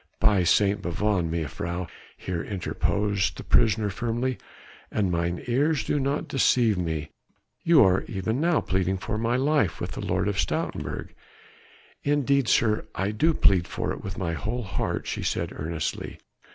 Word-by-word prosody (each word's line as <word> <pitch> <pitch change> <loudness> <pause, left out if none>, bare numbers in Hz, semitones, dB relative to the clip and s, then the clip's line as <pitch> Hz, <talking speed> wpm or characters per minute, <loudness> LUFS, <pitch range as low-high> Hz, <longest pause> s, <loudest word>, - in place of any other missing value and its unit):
"By 100 -4 +4
St. 100 +3 +3
Bavon, 90 -1 0
mejuffrouw," 85 +3 -3 0.3
here 90 -2 -3
interposed 100 +1 -1
the - - -7
prisoner 110 -2 +3
firmly, 120 +4 -2 0.5
"an 100 -4 0
mine 85 0 -1
ears 140 +5 +1
do 145 - 0
not 140 +2 -1
deceive 120 -4 +3
me 80 -4 -3 0.5
you 165 -4 +6
are 95 0 +4
even 110 +5 -2
now 170 -1 +3
pleading 95 0 0
for 105 +3 -3
my 115 +2 +1
life 145 +4 +1
with - - -4
the - - -6
Lord - - 0
of - - -1
Stoutenburg." - - -2 0.9
"Indeed, 140 -3 +2
sir, 110 -2 +2
I 95 +3 0
do 155 +10 +2
plead 95 -4 +4
for - - -3
it - - -6
with 95 -2 -6
my 85 -3 -2
whole 120 +8 -3
heart," 95 -7 -2
she - - -3
said - - -2
earnestly. 80 0 -4
105 Hz, 155 wpm, -26 LUFS, 90-125 Hz, 0.9 s, you